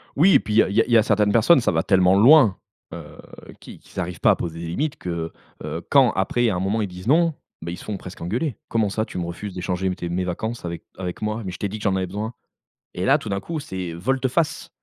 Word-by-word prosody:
Oui 180 Hz, +6 st, +5 dB
et -, -, +7 dB
puis 105 Hz, -, -5 dB
il -, -, +2 dB
y -, -, +8 dB
a -, -, -2 dB
il 105 Hz, +4 st, +1 dB
y 115 Hz, -, +7 dB
a 110 Hz, -, +5 dB
certaines 105 Hz, -2 st, +2 dB
personnes, 120 Hz, +6 st, +5 dB
ça -, -, +1 dB
va 80 Hz, 0 st, 0 dB
tellement 95 Hz, -1 st, +4 dB
loin. 120 Hz, -, +6 dB, 0.4 s
Heu, -, -, -10 dB, 0.4 s
qu'ils -, -, -12 dB
qu'ils -, -, -10 dB
arrivent 90 Hz, 0 st, -4 dB
pas -, -, +6 dB
à -, -, +3 dB
poser 85 Hz, -1 st, -5 dB
des 85 Hz, -, -5 dB
limites 145 Hz, -, -2 dB
que, 85 Hz, -2 st, -5 dB, 0.3 s
heu, -, -, -4 dB
quand -, -, +5 dB
après 120 Hz, -1 st, +1 dB
à 95 Hz, -, -1 dB
un -, -, -1 dB
moment 100 Hz, +4 st, 0 dB
ils 100 Hz, -, -1 dB
disent 90 Hz, +3 st, -10 dB
non, 165 Hz, +3 st, +4 dB, 0.3 s
ben 85 Hz, +1 st, -5 dB
ils 90 Hz, -, -6 dB
se -, -, -11 dB
font 105 Hz, -2 st, -4 dB
presque 90 Hz, -1 st, -11 dB
engueulés: 120 Hz, -, -2 dB
«Comment 110 Hz, -3 st, +1 dB
ça 110 Hz, +2 st, -1 dB
tu 95 Hz, -, -8 dB
me 85 Hz, -, -2 dB
refuses 90 Hz, +3 st, -6 dB
d'échanger 90 Hz, 0 st, -2 dB
tes 85 Hz, -, -5 dB
mes 90 Hz, +1 st, -1 dB
vacances 110 Hz, +6 st, -4 dB
avec 85 Hz, 0 st, -5 dB
avec 90 Hz, 0 st, -5 dB
moi, 110 Hz, +2 st, -2 dB
mais 90 Hz, -, -4 dB
je 90 Hz, -, -8 dB
t'ai 100 Hz, -, -2 dB
dit 105 Hz, +2 st, -6 dB
que -, -, -9 dB
j'en 95 Hz, -2 st, +1 dB
avais 95 Hz, -1 st, -1 dB
besoin!» 105 Hz, +5 st, -5 dB, 0.6 s
et 90 Hz, -, -3 dB
là 135 Hz, +3 st, +5 dB
tout 125 Hz, -, -9 dB
d'un 100 Hz, 0 st, -1 dB
coup 160 Hz, +7 st, -5 dB
c'est, 95 Hz, -, -5 dB
heu, -, -, -7 dB
volte-face. 135 Hz, -, -1 dB
100 Hz, 275 wpm, -23 LUFS, 90-120 Hz, 0.6 s, y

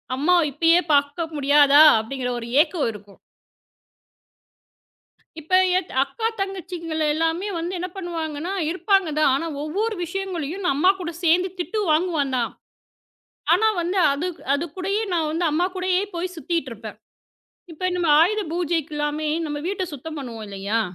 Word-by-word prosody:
அம்மா 305 Hz, +7 st, +3 dB, 0.2 s
இப்பயே 330 Hz, +5 st, +4 dB
பார்க்க 285 Hz, +3 st, +1 dB
முடியாதா 290 Hz, +1 st, +6 dB, 0.2 s
அப்படிங்கிற 250 Hz, +3 st, -4 dB
ஒரு 230 Hz, -, -7 dB
ஏக்கம் 315 Hz, -5 st, 0 dB
இருக்கும். 205 Hz, -2 st, -14 dB, 2.2 s
இப்ப 320 Hz, +4 st, 0 dB, 0.2 s
என் 375 Hz, -, -3 dB
அக்கா 445 Hz, +12 st, -3 dB
தங்கச்சிகள 355 Hz, -4 st, -4 dB
எல்லாமே 325 Hz, +5 st, -1 dB
வந்து 345 Hz, +3 st, -4 dB
என்ன 360 Hz, -, -3 dB
பண்ணுவாங்கன்னா, 335 Hz, -2 st, -4 dB, 0.2 s
இருப்பாங்கதான். 340 Hz, -3 st, +2 dB
ஆனா 330 Hz, +5 st, -2 dB, 0.2 s
ஒவ்வொரு 415 Hz, +9 st, -2 dB
விஷயங்களையும் 365 Hz, -1 st, -4 dB
நான் 315 Hz, -, +2 dB
அம்மா 365 Hz, +6 st, +5 dB
கூடச் 340 Hz, -1 st, -6 dB
சேர்ந்து 355 Hz, +3 st, +3 dB
திட்டு 360 Hz, +5 st, -2 dB
வாங்குவேன் 310 Hz, -4 st, +1 dB
தான். 235 Hz, -2 st, -1 dB, 1.0 s
ஆனால் 440 Hz, -2 st, +2 dB
வந்து 355 Hz, +3 st, -2 dB, 0.6 s
அதற்குடைய 365 Hz, +6 st, -3 dB, 0.2 s
நான் 320 Hz, -3 st, 0 dB
வந்து 335 Hz, +2 st, -1 dB
அம்மா 330 Hz, +4 st, +1 dB
கூடவே 370 Hz, +1 st, +1 dB
போய் 360 Hz, +2 st, -3 dB
சுற்றிட்டு 330 Hz, -4 st, -3 dB
இருப்பேன். 220 Hz, -1 st, -10 dB, 0.7 s
இப்பொழுது 360 Hz, +3 st, -2 dB
நாம் 330 Hz, -4 st, +4 dB
ஆயுத 425 Hz, +5 st, +2 dB
பூஜைக்கு 330 Hz, -3 st, -1 dB
எல்லாம் 295 Hz, +1 st, -2 dB, 0.2 s
நம்முடைய 295 Hz, 0 st, -4 dB
வீட்டைச் 375 Hz, -3 st, -3 dB
சுத்தம் 310 Hz, +3 st, -7 dB
பண்ணுவோம் 235 Hz, -5 st, -7 dB
இல்லையா? 200 Hz, +3 st, -2 dB
330 Hz, 135 wpm, -23 LUFS, 290-360 Hz, 2.2 s, முடியாதா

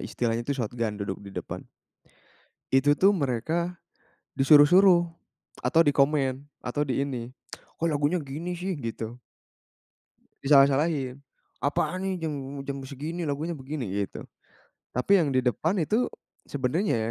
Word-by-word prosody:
istilahnya 115 Hz, -1 st, -1 dB
itu 140 Hz, -, 0 dB
shotgun 115 Hz, -2 st, -2 dB
duduk 100 Hz, -2 st, -4 dB
di 100 Hz, -, -10 dB
depan. -, -, -5 dB, 1.1 s
Itu 145 Hz, +2 st, +4 dB
tuh 195 Hz, +2 st, +6 dB
mereka, 165 Hz, -, -1 dB, 0.6 s
disuruh-suruh 170 Hz, +6 st, +6 dB, 0.6 s
atau 165 Hz, -, +4 dB
dikomen 140 Hz, -2 st, +2 dB, 0.2 s
atau 145 Hz, +4 st, -1 dB
di 135 Hz, 0 st, 0 dB
ini. 125 Hz, -3 st, -4 dB, 0.5 s
"Kok 165 Hz, -, +2 dB
lagunya 150 Hz, +4 st, +1 dB
gini 150 Hz, +6 st, -5 dB
sih," 180 Hz, +1 st, -3 dB
gitu. 115 Hz, 0 st, -5 dB, 1.2 s
Disalah-salahin. 140 Hz, -1 st, +3 dB, 0.4 s
Apaan 170 Hz, +5 st, 0 dB
nih 190 Hz, 0 st, -1 dB
jam 155 Hz, -, -2 dB, 0.3 s
jam 140 Hz, 0 st, -4 dB
segini 155 Hz, +5 st, -5 dB
lagunya 155 Hz, +4 st, -2 dB
begini, 140 Hz, -2 st, -5 dB, 0.2 s
gitu. 100 Hz, -, -6 dB, 0.7 s
Tapi 195 Hz, +11 st, +4 dB
yang 145 Hz, -6 st, +1 dB
di 130 Hz, -, +3 dB
depan 155 Hz, -, 0 dB
itu 220 Hz, +10 st, +1 dB, 0.4 s
sebenarnya 130 Hz, -, 0 dB
140 Hz, 125 wpm, -27 LUFS, 130-165 Hz, 1.2 s, tuh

